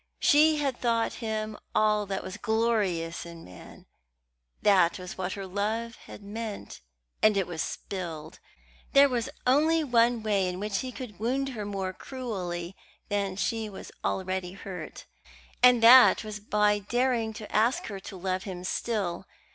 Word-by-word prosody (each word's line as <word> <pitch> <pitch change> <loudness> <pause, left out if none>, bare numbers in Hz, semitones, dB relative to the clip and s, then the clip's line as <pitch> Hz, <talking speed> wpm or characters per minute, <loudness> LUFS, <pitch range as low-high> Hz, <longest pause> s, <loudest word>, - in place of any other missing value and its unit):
She 305 +1 +5
had 275 -4 -1
thought 230 -2 +1
him 215 -1 -3 0.2
all 210 -1 +2
that 195 0 -3
was 185 - -6
glorious 210 -8 0
in 170 -1 -11
man 90 -1 -13 0.8
that 185 -4 +4
was 180 -1 -8
what 185 0 -3
her 195 -1 -6
love 215 +4 -2
had 205 - -11
meant; 215 +1 -6 0.4
and 215 -2 +4
it 195 - +2
was 170 -2 -4
spilled. 165 -4 -6 0.5
There 280 0 +8
was 245 -4 -2 0.2
only 310 +5 +3
one 240 -3 +2
way 200 -3 +1
in 180 0 -5
which 205 -1 -2
he 255 - -4
could 240 -7 -9
wound 265 +5 0
her 220 -5 -5
more 195 -2 -3
cruelly 185 -8 -5 0.3
than 200 -2 -1
she 215 +4 -2
was 195 - -10
already 185 -1 -2
hurt, 190 -1 -8 0.6
and 245 -2 +6
that 245 0 +8
was 215 -1 -6
by 210 0 +2
daring 235 +2 0
to 215 0 -9
ask 230 +4 +2
her 200 -2 -6
to 190 0 -9
love 185 0 -2
him 185 -2 -7
still. 195 -2 -2
210 Hz, 155 wpm, -28 LUFS, 190-235 Hz, 0.8 s, There